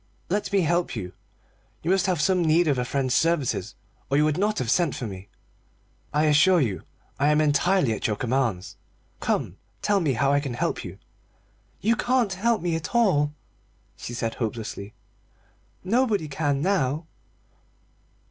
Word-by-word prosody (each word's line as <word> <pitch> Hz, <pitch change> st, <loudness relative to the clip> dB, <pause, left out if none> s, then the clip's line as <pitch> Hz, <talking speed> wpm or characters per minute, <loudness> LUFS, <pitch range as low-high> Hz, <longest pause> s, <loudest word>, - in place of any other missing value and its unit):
Let 205 Hz, +4 st, -1 dB
me 200 Hz, -1 st, +3 dB
help 170 Hz, -1 st, 0 dB
you. 90 Hz, -5 st, -6 dB, 0.7 s
You 170 Hz, -, +1 dB
must 190 Hz, 0 st, +2 dB
have 180 Hz, -4 st, 0 dB
some 180 Hz, +3 st, +2 dB
need 165 Hz, +1 st, +3 dB
of 140 Hz, -4 st, +2 dB
a 125 Hz, -, -1 dB
friend's 130 Hz, 0 st, -1 dB
services, 165 Hz, -5 st, 0 dB, 0.3 s
or 140 Hz, -, +2 dB
you 150 Hz, -, +4 dB
would 155 Hz, -1 st, +1 dB
not 210 Hz, +2 st, +1 dB
have 125 Hz, -3 st, -1 dB
sent 170 Hz, -3 st, +2 dB
for 125 Hz, -, -4 dB
me. 95 Hz, -2 st, -8 dB, 0.8 s
I 150 Hz, +1 st, +2 dB
assure 155 Hz, +5 st, +5 dB
you 115 Hz, -10 st, -1 dB, 0.4 s
I 140 Hz, -, +3 dB
am 150 Hz, 0 st, +4 dB
entirely 155 Hz, -2 st, +2 dB
at -, -, -2 dB
your 105 Hz, -, 0 dB
commands. 120 Hz, -5 st, -1 dB, 0.4 s
Come, -, -, -1 dB, 0.3 s
tell 205 Hz, -1 st, +3 dB
me 155 Hz, -7 st, +1 dB
how 140 Hz, +3 st, +2 dB
I 145 Hz, -, +4 dB
can 135 Hz, -4 st, -4 dB
help -, -, -2 dB
you -, -, -8 dB, 0.4 s
" -, -, -38 dB
"You 230 Hz, -, +5 dB
can't 245 Hz, -5 st, +1 dB
help 220 Hz, +2 st, 0 dB
me 170 Hz, -2 st, 0 dB
at 165 Hz, +7 st, -5 dB
all," 150 Hz, -11 st, +3 dB, 0.6 s
she 120 Hz, -, -7 dB
said 115 Hz, -1 st, -2 dB
hopelessly, 110 Hz, -3 st, -5 dB, 0.9 s
"nobody 210 Hz, -4 st, +1 dB
can 145 Hz, -1 st, -1 dB
now." 160 Hz, -5 st, 0 dB
150 Hz, 165 wpm, -25 LUFS, 130-185 Hz, 0.9 s, assure